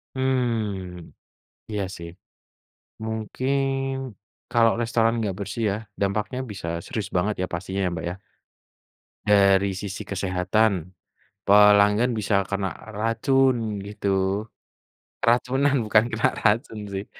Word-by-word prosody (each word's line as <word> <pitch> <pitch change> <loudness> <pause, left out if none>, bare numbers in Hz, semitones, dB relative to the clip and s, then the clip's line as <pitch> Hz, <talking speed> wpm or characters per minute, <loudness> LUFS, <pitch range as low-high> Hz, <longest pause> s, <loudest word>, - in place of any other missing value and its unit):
Mmm 110 -9 -2 0.6
iya 105 -2 -1
sih. 85 0 -8 1.0
Mungkin 110 +5 -2 1.0
kalau 115 -1 +5
restoran 115 -1 +2
gak 95 -1 -4
bersih 110 +3 -4
ya, - - -1 0.3
dampaknya 105 +6 -1
bisa 95 -4 -7 0.2
serius 105 -5 -4
banget 100 +4 +1
ya 95 - +1
pastinya 95 +3 -3
ya - - +1
Mbak 80 -1 -4
ya. 90 - -8 1.1
Dari 100 -1 +4
sisi 95 0 -6
kesehatan, 95 0 0 0.5
pelanggan 105 +3 +6
bisa 100 -2 +2
kena 100 -1 -2 0.2
racun 115 +1 +1
gitu. 100 +1 -1 0.7
Keracunan 130 +3 +2
bukan 110 0 +3
kena 115 - +2 0.2
racun 110 +1 +2
sih, 95 +1 -3
105 Hz, 110 wpm, -24 LUFS, 95-115 Hz, 1.1 s, pelanggan